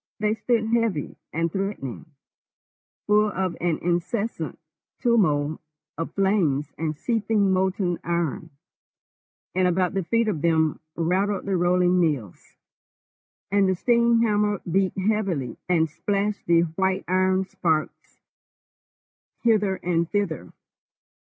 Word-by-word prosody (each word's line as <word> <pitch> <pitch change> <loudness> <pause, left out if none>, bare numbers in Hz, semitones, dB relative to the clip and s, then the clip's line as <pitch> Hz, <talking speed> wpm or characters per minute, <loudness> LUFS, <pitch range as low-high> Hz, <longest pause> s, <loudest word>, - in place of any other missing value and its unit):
They 210 0 +1
stood 225 0 0
heavy 225 - 0 0.2
and 165 +1 -1
threatening, 190 - -4 1.0
full 210 +1 +4
of 190 -3 -2
an 170 -2 +1
incessant 175 +1 -2 0.4
turmoil 160 - +2 0.3
of 165 +2 -5
flames 170 -8 +1
and 155 -1 -3
seething 215 -2 +1
molten 185 -1 0
iron, 170 0 -2 1.0
and 185 0 +2
about 180 +1 +1
the 195 -1 -1
feet 230 +6 +1
of 175 -9 -1
them 160 -2 +2 0.2
rattled 190 +4 0
the 195 -1 0
rolling 180 0 +3
mills, 145 - -2 1.0
and 200 -1 +3
the 190 - +2
steam 235 +2 +3
hammer 210 -2 +1
beat 190 +1 +1
heavily 190 - -1
and 165 -3 +3
splashed 200 +5 -2
the 170 0 +5
white 190 +3 -1
iron 185 +1 +2
sparks 160 -4 -2 1.3
hither 210 -4 +3
and 170 -1 0
thither. 170 - -2
185 Hz, 115 wpm, -24 LUFS, 165-205 Hz, 1.3 s, the